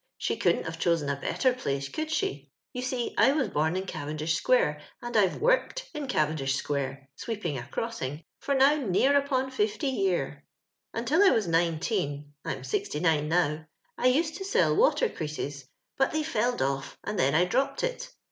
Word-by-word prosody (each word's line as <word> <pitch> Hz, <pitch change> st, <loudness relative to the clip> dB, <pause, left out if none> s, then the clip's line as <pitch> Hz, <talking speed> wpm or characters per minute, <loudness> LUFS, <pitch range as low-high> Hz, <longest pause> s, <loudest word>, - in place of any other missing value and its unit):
She -, -, -1 dB
couldn't -, -, +1 dB
have 165 Hz, 0 st, -6 dB
chosen 165 Hz, -5 st, +1 dB
a 140 Hz, -, +1 dB
better 255 Hz, -2 st, +1 dB
place, 140 Hz, -, -2 dB
could 310 Hz, -, -4 dB
she? 145 Hz, -, -2 dB, 0.2 s
You 250 Hz, -, -3 dB
see 255 Hz, -1 st, -2 dB
I 270 Hz, -, +6 dB
was 275 Hz, -7 st, 0 dB
bom 160 Hz, +1 st, 0 dB
in 190 Hz, +1 st, -2 dB
Cavendish 155 Hz, -2 st, -3 dB
square, 155 Hz, -6 st, +2 dB, 0.2 s
and 240 Hz, -1 st, -6 dB
I've 195 Hz, -4 st, +4 dB
toorked -, -, +2 dB
in 295 Hz, -2 st, -4 dB
Cavendish 150 Hz, -, 0 dB
square 135 Hz, -1 st, -3 dB
— -, -, -54 dB
sweeping 200 Hz, -6 st, -4 dB
a 120 Hz, -, -8 dB
crossing 150 Hz, -, -4 dB
— -, -, -60 dB
for 280 Hz, -, -1 dB
now 270 Hz, +2 st, +6 dB
near 265 Hz, +2 st, +2 dB
upon 265 Hz, -2 st, +1 dB
fifty 215 Hz, +2 st, 0 dB
year. 180 Hz, -, -1 dB, 0.3 s
" -, -, -58 dB
Until 245 Hz, -, +2 dB
I 405 Hz, -, +8 dB
was 220 Hz, -, +2 dB
nineteen 165 Hz, -3 st, 0 dB
— -, -, -57 dB
I'm 130 Hz, -, -4 dB
sixty 135 Hz, +3 st, -2 dB
nine 155 Hz, -3 st, +2 dB
now 155 Hz, -2 st, +1 dB, 0.2 s
— -, -, -42 dB
I 250 Hz, -, +3 dB
used 310 Hz, +5 st, +2 dB
to 385 Hz, -, -5 dB
sell 390 Hz, -, +2 dB
water -, -, +4 dB
creases, 145 Hz, -, -5 dB, 0.3 s
but 270 Hz, -, +3 dB
they 310 Hz, 0 st, 0 dB
felled 245 Hz, -, 0 dB
off 135 Hz, 0 st, -2 dB
and 210 Hz, -, -3 dB
then 140 Hz, +2 st, +3 dB
I 175 Hz, +3 st, +5 dB
dropped 275 Hz, +9 st, 0 dB
it. -, -, -3 dB
185 Hz, 195 wpm, -28 LUFS, -, 0.3 s, I